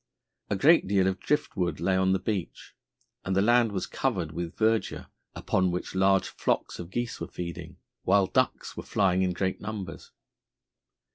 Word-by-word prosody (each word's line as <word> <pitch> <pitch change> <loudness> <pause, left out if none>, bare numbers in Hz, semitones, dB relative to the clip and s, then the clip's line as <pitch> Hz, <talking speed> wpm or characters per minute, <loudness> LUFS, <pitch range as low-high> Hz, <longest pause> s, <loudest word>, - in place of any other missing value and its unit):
A - - +1
great 155 - +5
deal 95 -1 +3
of 95 +1 0
drift 150 0 -1
wood 90 -3 -1
lay 95 - +1
along 95 0 +3
the - - +3
beach, 95 -2 -4 0.5
and 95 - -1
the 95 - +4
land 120 0 +4
was 95 -2 -2
covered 80 -3 -2
with 85 +1 -5
verdure 110 0 +1 0.3
upon 95 -1 +1
which 90 +1 -4
large 95 0 +3
flocks - - -2
of 85 -1 -7
geese 120 +3 -3
were - - -3
feeding, 85 -2 -7 0.2
while 100 0 +4
ducks - - 0
were - - -5
flying 95 -2 +1
in 95 -1 +1
great 95 +1 -2
numbers. 105 -6 -6
95 Hz, 170 wpm, -28 LUFS, 90-105 Hz, 0.5 s, great